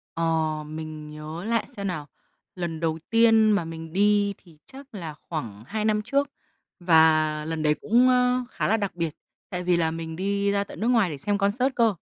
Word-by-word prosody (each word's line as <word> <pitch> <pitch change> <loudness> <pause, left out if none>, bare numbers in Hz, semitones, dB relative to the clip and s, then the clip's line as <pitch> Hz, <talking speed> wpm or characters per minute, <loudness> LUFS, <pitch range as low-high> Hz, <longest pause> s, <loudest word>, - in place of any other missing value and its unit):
Ờ, 165 - -1 0.4
mình 155 0 -7
nhớ 155 +3 -7
lại 225 -1 0
xem 200 -1 -3
nào. 155 -6 -4 0.5
Lần 170 -3 -4
đầu 160 -1 -1
tiên 225 -1 +5
mà 200 -5 +1
mình 165 0 -8
đi 205 +1 +3
thì 170 -5 -20
chắc 275 0 -13
là 165 -6 -6
khoảng 120 -10 -7
2 215 +1 -2
năm 210 -1 +2
trước, 280 +5 0 0.5
và 160 -3 +4
lần 160 0 -3
đấy 150 -1 +4
cũng, 245 +4 +4
ơ, 250 0 +3
khá - - -1
là 220 - +3
đặc 200 -4 -3
biệt, 165 -3 -2 0.3
tại 180 -2 -4
vì 175 -1 +2
là 165 -1 +1
mình 160 0 -5
đi 200 +2 0
ra 200 0 +1
tận - - -11
nước 225 - 0
ngoài 230 -6 +3
để 150 - -5
xem 205 +9 0
concert 240 +7 +1
cơ. 225 -4 +3
180 Hz, 205 wpm, -25 LUFS, 160-215 Hz, 0.5 s, tiên